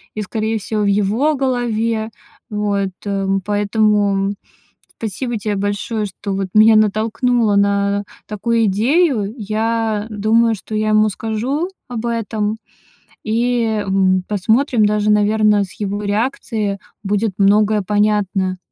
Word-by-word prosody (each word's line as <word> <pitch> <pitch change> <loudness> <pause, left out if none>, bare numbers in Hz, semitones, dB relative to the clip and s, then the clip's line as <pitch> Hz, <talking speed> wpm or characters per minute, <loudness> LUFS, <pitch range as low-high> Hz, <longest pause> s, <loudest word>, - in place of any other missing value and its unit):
и, 215 - -3
скорее 220 +2 -2
всего, 215 +1 -3
в - - +1
его 210 +9 +2
голове. 230 -4 -1 0.4
Вот, 205 -2 -1 0.2
эм. 195 -1 -1
Поэтому 205 -1 +1 0.6
спасибо 230 +2 -3
тебе 205 0 -2
большое, 205 +2 -2
что, 200 0 -5
вот, 195 0 -2
меня 220 +1 +6
натолкнуло 220 +1 +1
на 200 0 +1 0.2
такую 225 +2 0
идею. 225 - +1
Я 220 0 -1
думаю, 225 +2 +2
что 215 +2 -8
я 215 0 0
ему 215 0 +4
скажу 230 - -2 0.2
об 240 -2 -4
этом 220 -2 -2 0.7
и, 230 -1 0
м, 190 -1 +2
посмотрим, 220 +3 +2
даже, 210 0 +1
наверное, 210 0 +3
с 185 - -11
его 205 0 -2
реакцией 210 -1 -1 0.3
будет 205 0 0
многое 210 +1 +3
понятно. 200 -2 0
210 Hz, 120 wpm, -18 LUFS, 200-225 Hz, 0.7 s, меня